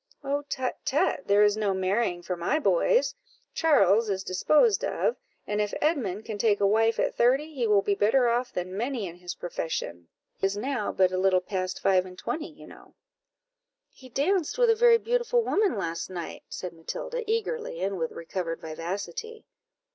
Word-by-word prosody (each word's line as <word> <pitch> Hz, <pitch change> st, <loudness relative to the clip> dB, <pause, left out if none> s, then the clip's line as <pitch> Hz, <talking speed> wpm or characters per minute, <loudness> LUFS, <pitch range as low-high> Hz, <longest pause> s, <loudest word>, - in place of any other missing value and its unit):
"Oh, 285 Hz, +1 st, -1 dB
tut, 260 Hz, -2 st, -3 dB
tut, 275 Hz, 0 st, 0 dB
there 205 Hz, +1 st, +5 dB
is 205 Hz, 0 st, +4 dB
no 205 Hz, -3 st, 0 dB
marrying 190 Hz, -1 st, 0 dB
for 180 Hz, -, -3 dB
my 175 Hz, -, 0 dB
boys. -, -, +2 dB, 0.4 s
Charles 225 Hz, -, +4 dB
is 190 Hz, -1 st, -1 dB
disposed 305 Hz, -, +3 dB
of, 475 Hz, -, 0 dB, 0.3 s
and 210 Hz, 0 st, -1 dB
if 210 Hz, -, -2 dB
Edmund 220 Hz, -, -1 dB
can 215 Hz, -3 st, -5 dB
take 205 Hz, -1 st, +3 dB
a 200 Hz, -, +3 dB
wife 225 Hz, +3 st, +3 dB
at -, -, 0 dB
thirty, 270 Hz, +6 st, +2 dB
he 245 Hz, -5 st, -1 dB
will 205 Hz, -2 st, +4 dB
be 200 Hz, -, +1 dB
better 230 Hz, +6 st, +3 dB
off 240 Hz, +1 st, 0 dB
than 185 Hz, +1 st, -4 dB
many 240 Hz, 0 st, -2 dB
in 175 Hz, -1 st, -8 dB
his 175 Hz, -1 st, -7 dB
profession; 160 Hz, -, -4 dB, 0.3 s
he 195 Hz, -, +1 dB
is 200 Hz, +1 st, -4 dB
now 245 Hz, -1 st, -2 dB
but 185 Hz, -1 st, +3 dB
a 185 Hz, -, -1 dB
little 190 Hz, -1 st, +4 dB
past 185 Hz, 0 st, -3 dB
five 185 Hz, -1 st, +3 dB
and 180 Hz, 0 st, -12 dB
twenty, 305 Hz, -, -4 dB
you -, -, -14 dB
know." -, -, -16 dB, 1.0 s
"He 260 Hz, -, -15 dB
danced 320 Hz, -, 0 dB
with 485 Hz, -2 st, +5 dB
a -, -, +3 dB
very 470 Hz, +1 st, +6 dB
beautiful 480 Hz, +1 st, +1 dB
woman 410 Hz, -, +1 dB
last 165 Hz, -3 st, -3 dB
night," 175 Hz, -2 st, -7 dB
said 180 Hz, -2 st, -6 dB
Matilda, -, -, -5 dB
eagerly, 450 Hz, -, -2 dB
and 195 Hz, -1 st, -2 dB
with 160 Hz, -1 st, -2 dB
recovered 165 Hz, 0 st, -4 dB
vivacity. 200 Hz, -, -6 dB
210 Hz, 185 wpm, -27 LUFS, 185-300 Hz, 1.0 s, very